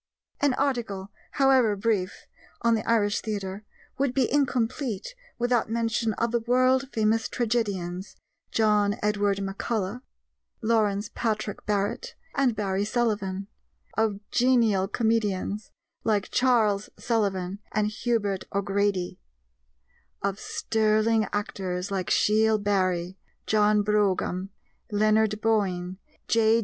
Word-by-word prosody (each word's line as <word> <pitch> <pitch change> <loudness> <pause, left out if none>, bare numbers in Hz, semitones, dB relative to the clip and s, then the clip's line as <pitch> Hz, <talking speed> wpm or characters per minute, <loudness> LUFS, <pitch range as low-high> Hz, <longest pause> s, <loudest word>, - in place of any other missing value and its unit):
An 285 -3 +2
article, 205 -8 -2 0.2
however 260 -6 +4
brief, 200 -2 -1 0.4
on 235 0 +4
the 220 - 0
Irish 210 -3 +2
Theatre, 205 -2 -4 0.3
would 275 -2 +1
be 265 -3 +2
incomplete 250 - 0 0.2
without 240 -2 +1
mention 230 0 0
of 235 +2 -1
the 235 - +2
world 255 +3 +2
famous 220 0 +1
tragedians, 200 -6 -2 0.4
John 210 -2 +3
Edward 205 -1 +1
MacCullough, 200 +3 -3 0.6
Lawrence 215 -3 +1
Patrick 215 -2 -2
Barrett, 210 - -1 0.2
and 265 -5 +2
Barry 200 -2 -1
Sullivan; 205 -4 -1 0.5
of 220 -2 +1
genial 235 -6 +3
comedians 210 -2 -1 0.3
like 210 -3 0
Charles 220 -5 +2
Sullivan 195 -4 -1
and 215 0 +1
Hubert 215 -4 -1
O'Grady; 200 -2 0 1.0
of 200 +1 -1
sterling 220 0 +1
actors 195 -4 -3
like 190 -2 -2
Shiel 220 +1 +3
Barry, 185 -3 0 0.3
John 210 -1 +3
Brougham, 195 -2 +1 0.4
Leonard 215 0 +2
Boyne, 190 -5 0 0.3
J. 225 0 +4
215 Hz, 105 wpm, -26 LUFS, 200-230 Hz, 1.0 s, however